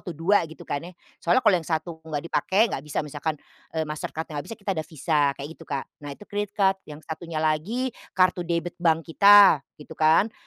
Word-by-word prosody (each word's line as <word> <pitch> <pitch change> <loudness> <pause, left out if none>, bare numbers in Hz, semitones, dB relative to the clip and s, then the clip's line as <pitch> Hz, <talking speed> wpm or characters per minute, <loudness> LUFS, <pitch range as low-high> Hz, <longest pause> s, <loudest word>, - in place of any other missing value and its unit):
2, 165 +1 +2
gitu 160 - -12
kan 145 - -3
ya. 175 +2 -10 0.3
Soalnya 175 +9 +2
kalau 210 -4 +6
yang 165 - -11
1 160 0 -3
enggak 145 -2 -3
dipakai, 190 +4 +1
enggak - - -2
bisa 150 0 -3
misalkan, 150 +1 -3 0.4
eee, 160 - +1
MasterCard-nya 150 0 -5
enggak - - -10
bisa, 225 - -7
kita 200 -1 -4
ada 160 -4 -3
visa, 155 0 0 0.2
kayak 140 - -7
gitu 165 - -14
Kak. 135 -1 -2 0.2
Nah 145 -1 -7
itu 210 - -14
credit 205 0 -4
card, 195 -1 +3
yang 150 0 -9
satunya 165 0 -6
lagi 210 +12 0 0.2
kartu 185 -1 +3
debit 170 0 -2
bank 165 -2 +2
kita, 200 -6 +8 0.2
gitu 150 +2 -12
kan, 160 +8 +4
165 Hz, 205 wpm, -25 LUFS, 155-190 Hz, 0.4 s, kita